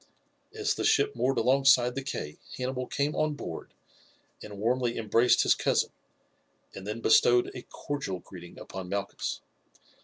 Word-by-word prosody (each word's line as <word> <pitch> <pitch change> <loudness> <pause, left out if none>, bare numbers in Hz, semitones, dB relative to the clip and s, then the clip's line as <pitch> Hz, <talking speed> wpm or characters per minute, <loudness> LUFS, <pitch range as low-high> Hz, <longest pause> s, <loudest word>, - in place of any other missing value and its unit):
As 435 -1 -1
the - - -4
ship 425 0 +3
moored 135 +1 0
alongside 130 -2 +4
the 135 - -3
quay 75 - -5 0.2
Hannibal 130 0 -3
came 145 +1 -1
on 155 -1 0
board - - -7 0.7
and 105 -1 -9
warmly 120 +3 0
embraced 115 +2 +3
his - - +5
cousin, - - 0 0.8
and 95 +1 -9
then 110 +2 -4
bestowed 120 +1 +4
a 125 - -7
cordial 140 -10 -4
greeting 90 -1 -12
upon 95 -2 -8
Malchus. 100 0 -3
125 Hz, 145 wpm, -28 LUFS, 105-135 Hz, 0.8 s, his